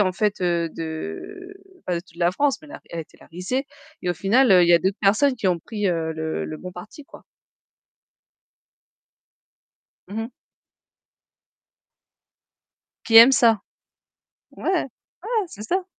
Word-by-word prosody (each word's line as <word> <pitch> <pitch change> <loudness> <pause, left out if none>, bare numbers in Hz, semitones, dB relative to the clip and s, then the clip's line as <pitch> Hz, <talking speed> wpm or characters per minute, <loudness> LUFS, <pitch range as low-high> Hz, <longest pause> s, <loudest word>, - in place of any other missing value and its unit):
en 185 -2 +2
fait, 205 +1 -1
heu, 170 -2 0
de 160 - -7 0.3
pas 180 - -1
de - - -3
toute 170 -2 -22
la 175 +1 +1
France, 285 +5 +1
mais 305 - -14 0.2
elle 170 - -7
a - - -1
été 160 - -14
la - - -16
risée 190 - -3 0.3
et 180 - -4
au 175 - 0
final, 210 +9 +3
heu, 180 -2 +7
il 170 - +3
y 175 - +6
a 170 - +7
d'autres 190 +3 -1
personnes 235 +7 +3
qui 225 - -2
ont 180 -2 +2
pris 210 +4 -4
heu, 165 -2 -1
le 160 0 -3
le 155 - -6
bon 180 +3 -9
parti, 210 +11 -11
quoi. - - -15 2.9
Mmh 210 +3 -5
mh. 225 - -6 2.8
Qui 225 - +6
aiment 235 +4 +10
ça. 230 -5 +4 0.9
Ouais, - - -12 0.2
ouais, 405 - -5
c'est 210 - -11
ça. 365 - -1
195 Hz, 160 wpm, -23 LUFS, 170-250 Hz, 2.9 s, aiment